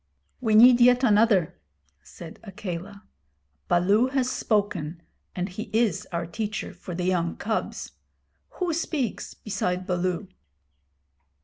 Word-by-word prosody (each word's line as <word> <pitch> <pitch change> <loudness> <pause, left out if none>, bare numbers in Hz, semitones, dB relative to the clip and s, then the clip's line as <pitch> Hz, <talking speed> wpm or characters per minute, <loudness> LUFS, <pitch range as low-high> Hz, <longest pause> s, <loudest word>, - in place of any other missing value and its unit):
'We 220 -4 +1
need 240 +2 +8
yet 250 +1 +6
another,' 210 - +3 0.4
said 160 - -12
Akela. 195 -1 -7 0.6
'Baloo 200 +7 +3
has 260 -1 0
spoken, 185 - -1 0.4
and 180 0 -2
he 205 +3 -7
is 220 -5 +1
our 170 -1 -2
teacher 210 +5 -4
for 180 - -8
the 180 0 -2
young 175 -2 0
cubs. 220 +1 -3 0.7
Who 360 -3 -1
speaks 305 - -3
beside 185 -3 -2
Baloo?' 180 +2 -1
205 Hz, 115 wpm, -26 LUFS, 180-230 Hz, 0.7 s, need